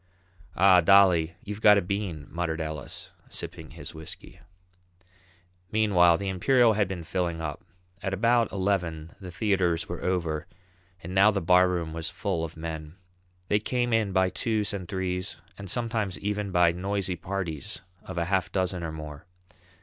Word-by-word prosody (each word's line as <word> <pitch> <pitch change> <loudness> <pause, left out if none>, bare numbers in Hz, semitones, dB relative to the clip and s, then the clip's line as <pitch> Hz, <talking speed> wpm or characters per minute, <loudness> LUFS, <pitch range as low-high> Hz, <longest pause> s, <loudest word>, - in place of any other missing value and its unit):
"Ah, 95 0 +6
Dolly, 90 -3 +5
you've 105 +1 -6
got 105 -1 +7
a - - +3
bean," 90 -5 -3
muttered 85 -1 -2
Ellis, 80 -2 -5 0.2
sipping - - -7
his - - -9
whisky. 80 0 -10 1.3
Meanwhile, 90 -6 +4
the 100 - -4
Imperial 115 +5 +4
had 105 -2 +1
been 90 -3 -5
filling 85 -1 -2
up; 75 -3 -5 0.4
at 95 - -2
about 115 +4 +2
eleven 90 -5 -1
the 95 -2 -8
theatres 90 -3 0
were 85 - -5
over, 85 -4 -1 0.6
and 90 +2 -6
now 100 +2 +6
the 100 -2 +1
barroom 90 -2 +3
was 80 0 -3
full 85 -1 -2
of 80 0 -6
men. 80 -1 -6 0.5
They 105 - +3
came 120 +2 -1
in 110 -3 +2
by 95 -1 +2
twos 110 -3 -1
and 95 -3 -5
threes 95 -1 -3 0.2
and 100 -1 -8
sometimes 110 -5 -1
even 105 0 -2
by 90 -1 +4
noisy 95 +1 -2
parties 85 -4 -5 0.2
of 95 - -8
a 85 - +1
half 95 -1 0
dozen 90 -2 -1
or 80 - -3
more. 75 +1 -8
90 Hz, 155 wpm, -27 LUFS, 85-100 Hz, 1.3 s, got